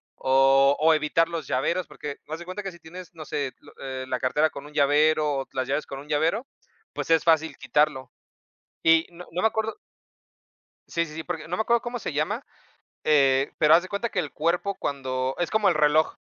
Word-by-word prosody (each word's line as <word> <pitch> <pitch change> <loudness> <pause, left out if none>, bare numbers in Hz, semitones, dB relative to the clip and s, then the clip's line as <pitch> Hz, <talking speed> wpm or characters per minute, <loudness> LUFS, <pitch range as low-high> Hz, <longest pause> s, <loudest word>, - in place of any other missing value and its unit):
o 135 +1 +4
o 160 +1 +5
evitar 155 +2 +2
los 165 -4 -5
llaveros, 170 +8 0
porque, 150 -1 -7
haz 160 +1 -4
de 175 - -9
cuenta 185 +3 -6
que 195 - -4
si 175 - -15
tienes, 180 +2 -11
no 160 -2 -9
sé, 140 -2 -3
lo - - -17
eh, 130 -1 -5
la 130 -1 -2
cartera 150 +5 +2
con 140 - -9
un 150 - -13
llavero 150 0 +3
o 135 - -5
las 130 -1 -2
llaves 140 +3 -1
con 135 - -7
un 145 - -12
llavero, 160 - 0 0.5
pues, - - -5
es 165 -1 +4
fácil 160 -1 +2
quitarlo. 135 0 0 0.7
Y 165 0 +5
no 175 +1 -12
no 175 +2 -2
me - - +5
acuerdo 220 0 -2 1.1
Sí, 170 - 0
sí, 155 -2 -11
sí, 160 - -5
porque, 160 -2 -6
no 175 - -2
me - - -3
acuerdo 235 +1 +2
cómo 245 0 -4
se 195 - -5
llama, 205 - -2 0.6
eh, 135 -2 +3
pero 155 0 +5
haz 165 - +7
de 185 - -9
cuenta 200 +5 -2
que 185 - -2
el 150 -5 -4
cuerpo 175 +5 0
cuando, 130 -3 -3
es 175 - 0
como 215 -2 +3
el - - +2
reloj. 155 +1 +3
155 Hz, 215 wpm, -25 LUFS, 140-175 Hz, 1.1 s, haz